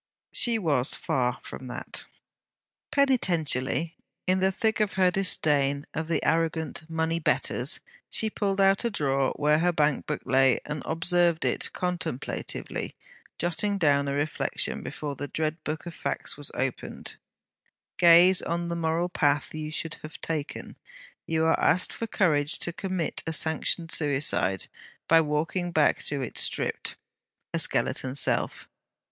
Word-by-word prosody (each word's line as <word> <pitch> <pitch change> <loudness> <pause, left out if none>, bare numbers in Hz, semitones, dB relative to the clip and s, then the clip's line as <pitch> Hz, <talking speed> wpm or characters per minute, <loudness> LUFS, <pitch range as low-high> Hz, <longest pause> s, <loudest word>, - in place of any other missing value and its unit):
She 235 -2 +4
was 145 - +1
far 125 -2 0
from 130 - -8
that. 125 - -6 0.9
Penitentially, 170 - +1 0.3
in 185 +1 +2
the 190 +1 +3
thick 220 +3 0
of 210 -2 +1
her 185 -1 +3
disdain 145 -7 +1
of 160 0 -3
the 165 - -1
arrogant 160 -1 0
money 160 0 0
Betters, 155 - +1 0.3
she 220 - +3
pulled 200 -2 -1
out 195 +2 +4
a 235 - +1
drawer 135 - +1
where 150 +1 +3
her 175 +2 +3
bank 150 -4 +1
book - - -3
lay, 130 -1 +4
and 150 -1 -4
observed 170 0 +2
it - - -1
contemplatively; 180 -7 -3 0.4
jotting 190 +4 -1
down 140 -5 +3
a 140 - -1
reflection 145 +2 -1
before 145 -2 -5
the 145 +2 -5
dread 155 +2 -2
book 155 +2 -4
of 175 - -6
facts - - -3
was 145 -1 -6
opened: 130 -1 -4 0.8
'Gaze 175 +2 +7
on 170 0 -2
the 170 - -2
moral 165 +1 0
path 145 -4 +1
you 155 -1 -4
should 160 0 -4
have 155 +1 -9
taken, 155 -3 -4 0.5
you 160 0 +1
are 160 - +3
asked 180 - +3
for 230 - -4
courage 150 -8 +2
to 170 - -2
commit 185 -3 -2
a 165 - -1
sanctioned 160 +1 -1
suicide, 135 - 0 0.4
by 165 0 +6
walking 160 +4 -1
back 155 -3 +3
to 140 -2 0
it 125 - -3
stripped - - 0 0.6
a - - +2
skeleton 130 0 +1
self.' 140 - -1
160 Hz, 145 wpm, -27 LUFS, 145-175 Hz, 0.9 s, Gaze